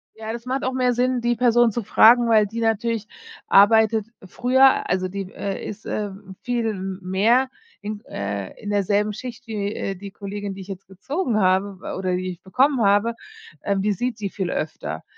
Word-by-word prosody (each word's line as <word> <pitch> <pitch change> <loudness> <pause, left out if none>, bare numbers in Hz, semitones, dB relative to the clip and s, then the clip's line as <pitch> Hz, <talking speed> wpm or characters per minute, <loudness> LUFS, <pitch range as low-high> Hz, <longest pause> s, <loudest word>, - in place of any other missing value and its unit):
Ja, 220 0 -6
das 235 0 -7
macht 260 +2 -2
auch 260 - -1
mehr 250 -1 +2
Sinn, 250 +1 +1
die 240 0 +1
Person 240 -1 +4
zu 235 +2 -3
fragen, 235 +3 +6
weil 220 -2 +5
die 225 +3 -6
natürlich 225 -1 0 0.4
arbeitet 220 +1 +5 0.2
früher, 260 +7 +3
also 185 +1 0
die 195 0 -6
äh 195 -1 -4
ist 215 +1 -8 0.6
viel 235 -3 -1 0.3
mehr 220 +8 +2 0.3
in 205 0 -5
äh, 100 -1 -5
derselben 205 +1 +1
Schicht 240 +2 -8
wie 205 -2 -3
äh, 195 - -3
die 195 +2 -9
Kollegin, 200 0 -6
die 195 - -9
ich 190 - -11
jetzt 195 -1 -8
gezogen 235 - -2
habe 190 +1 +2 0.2
oder 185 -1 -1
die 185 +1 -3
ich 180 0 -8
bekommen 260 +7 +2
habe, 205 +3 +3 0.5
äh, 200 - 0
die 205 +2 +1
sieht 240 +3 -3
sie 205 -2 -3
viel 190 -2 -3
öfter. 155 - -4
215 Hz, 180 wpm, -23 LUFS, 195-240 Hz, 0.6 s, fragen